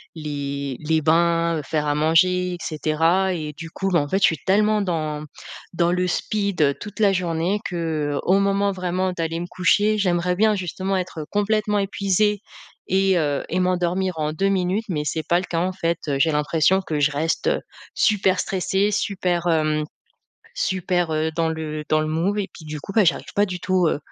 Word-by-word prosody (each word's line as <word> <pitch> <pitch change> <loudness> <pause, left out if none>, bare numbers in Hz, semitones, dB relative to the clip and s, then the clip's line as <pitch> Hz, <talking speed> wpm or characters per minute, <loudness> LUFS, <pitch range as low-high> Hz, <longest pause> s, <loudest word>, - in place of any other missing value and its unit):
les 140 -3 -4
les 160 +1 0
bains, 165 +1 +2
heu, - - -3
faire 150 +1 -1
à 145 - +1
manger 180 +4 +2
et - - -8
cetera 165 +5 +1
et 155 -3 -4
du 165 +2 -8
coup, 195 +3 -2
bah 170 - +4
en 145 - -1
fait, 190 - +1
je - - -1
suis 160 -4 +1
tellement 210 +2 +3
dans 155 -5 -2 0.5
dans 170 0 +2
le 180 0 +1
speed, 200 0 -1
heu, 140 -1 +3
toute 210 +6 -10
la 200 -2 +4
journée 175 +2 0
qu'au 165 +1 0
moment 200 0 +1
vraiment 185 0 -1
d'aller 165 -1 -3
me 175 - -4
coucher, 205 +4 +2
j'aimerais 180 -1 +1
bien 215 +1 +3
justement 190 +1 -2
être, 180 -3 -4
heu, - - -6
complètement 210 0 +1
épuisée 200 +1 +1 0.5
et 190 -1 +2
heu 145 -2 0
et 180 - 0
m'endormir 180 0 0
en 155 0 -1
2 195 +5 +1
minutes. 190 +3 0
Mais 150 -4 -1
c'est 160 +1 -2
pas 175 - +3
le 185 - -5
cas 170 -2 -2
en 180 +2 0
fait, 170 -2 -1
heu, 140 -2 0
j'ai 160 +4 +3
l'impression 155 +5 +2
que 155 -5 -3
je 145 +1 +3
reste, 155 +3 -1
heu, - - +1 0.3
super 195 -3 +2
stressée, 195 +2 0
super, 180 -4 -1
hem, 155 -2 +1 0.7
super, 180 - 0
heu, 155 +1 0
dans 165 0 +1
le 155 -1 -4
dans 155 0 +3
le 155 - -1
move 170 +7 0
et 200 - -1
puis 160 - -12
du 150 0 -6
coup, 170 - -8
bah, 220 - +5
j'arrive 170 - 0
pas 205 - +3
du 180 -2 -5
tout, 180 -2 +1
heu, - - 0
175 Hz, 200 wpm, -22 LUFS, 155-190 Hz, 0.7 s, bah